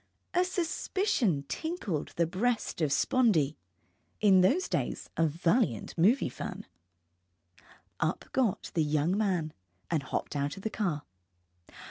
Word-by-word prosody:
A 360 0 +4
suspicion 355 - 0
tinkled 215 - -3
in - - -18
the 170 - +2
breast 210 +3 -1
of 155 - +2
Spondee, 170 - +3 0.6
in 195 -3 +6
those 295 - +3
days - - -2
a 165 - +3
valiant 165 - 0
movie 210 +11 +4
fan. 125 - -6 1.3
Up - - -1
got 245 -8 0
the 165 - +2
young 150 +4 +1
man, 180 -7 0 0.4
and 160 -3 +2
hopped 140 - -4
out 145 +5 -1
of 195 - -9
the 220 - -2
car. 170 -9 -1
185 Hz, 130 wpm, -30 LUFS, 155-245 Hz, 1.3 s, in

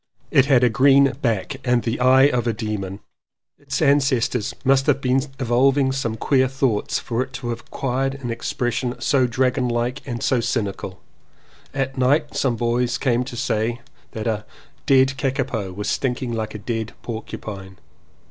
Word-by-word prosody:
It 135 - +4
had 130 -3 +4
a 125 - +5
green 135 +3 +5
back 115 +3 -1
and 125 -2 +2
the 115 +1 -2
eye 130 +1 +6
of 125 -4 +2
a 115 - +1
demon. 105 -3 -4 0.6
Its - - -2
ancestors 130 -5 +2
must 135 0 +3
have 145 -2 +3
been 130 0 +2 0.2
revolving 130 +2 +3
some 120 -4 -2
queer 130 +2 +2
thoughts 130 -5 0
for 120 0 -2
it 130 0 -5
to 135 -3 -5
have 115 0 -3
acquired 135 +2 -2
an 130 -4 -5
expres 120 +1 -2
sion 125 0 -3
so 130 -3 +2
dragon 125 +1 +1
like 120 +3 -1
and 120 -3 -4
cynical. 115 -7 -1 0.7
At 135 -1 -3
night 145 +4 +2
some 130 -4 +1
boys 120 +1 0
came 125 -2 +1
to 120 - -7
say 115 0 -1 0.3
that 110 - -5
"a 110 -2 -1 0.4
dead 135 0 +4
kakapo 130 -7 -2
was 100 +3 -5
stinking 125 -1 -1
like 110 -1 -3
a - - -3
dead 110 +1 -4
porcupine." 100 -4 -7
125 Hz, 165 wpm, -22 LUFS, 115-135 Hz, 0.7 s, eye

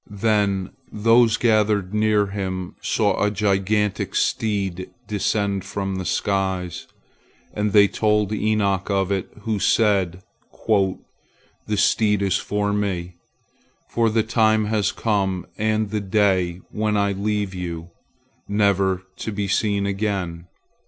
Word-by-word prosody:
Then 100 -2 0 0.2
those 115 +1 +4
gathered 105 -4 +2
near 105 -1 +2
him 95 -2 -4
saw - - +1
a 105 - +3
gigantic 105 0 0
steed 95 -4 -1 0.2
descend 100 -2 -1
from 100 -1 -3
the 95 - -4
skies, 95 -3 -1 0.7
and 105 0 -1
they 100 -1 +6
told 105 0 +1
Enoch 105 -3 0
of 100 -1 0
it, 95 -2 -1
who 110 -1 -2
said, 95 -5 +2 0.4
"The 100 -4 +2 0.8
steed 105 0 +2
is 95 - +2
for 105 0 -1
me, 90 -4 -2 0.7
for 115 -1 +2
the 110 0 +1
time 110 -1 +2
has 105 -2 0
come 95 -4 -1
and 110 -1 0
the 105 -1 -1
day 95 -3 +1
when 105 0 0
I 100 0 +2
leave 100 0 -2
you, 85 -2 -6 0.6
never 100 -2 +1
to 110 - -4
be 100 -1 -2
seen 100 +1 +1
again." 95 -4 -2
100 Hz, 125 wpm, -22 LUFS, 95-105 Hz, 0.8 s, they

